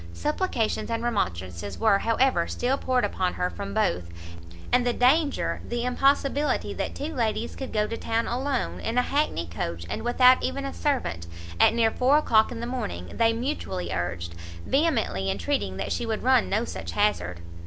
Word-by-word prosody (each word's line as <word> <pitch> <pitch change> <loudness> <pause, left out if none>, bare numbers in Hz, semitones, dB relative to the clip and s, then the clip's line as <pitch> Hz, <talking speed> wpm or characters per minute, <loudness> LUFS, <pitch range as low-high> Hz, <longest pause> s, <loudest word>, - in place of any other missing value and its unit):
Supplications 300 - -1
and 230 0 -2
remonstrances 95 - -2
were, 215 -3 +4
however, 230 -6 +2
still 255 +2 0
poured 255 -4 +1
upon 185 -2 -1
her 180 0 -1
from 200 0 -6
both, 90 - 0 0.6
and 250 0 +4
the 245 0 +1
danger, 280 +5 +2
the 240 0 -3
impossibility 275 +3 +1
that - - -4
two 305 +3 -4
ladies 230 -3 -1
could 265 - -6
go 210 -1 +1
to 230 - -4
town 230 0 -1
alone, 260 +1 -2
in 225 +2 -3
a 250 - +4
hackney 285 - 0
coach, 85 0 -4
and - - -3
without 250 +1 +5
even 275 0 -2
a 275 - -4
servant, 85 - -1 0.3
at - - +5
near 225 -1 +3
four 260 +6 +3
o'clock 220 -7 +3
in 230 -2 -5
the - - -3
morning, 220 - -4
they 230 0 +4
mutually 225 - -3
urged, 85 0 -3 0.3
vehemently 270 - +1
entreating 95 0 -1
that 95 - -3
she 235 - -2
would 220 -1 -2
run 255 -1 +4
no 215 +4 +1
such - - -6
hazard. 90 - 0
230 Hz, 175 wpm, -26 LUFS, -, 0.6 s, without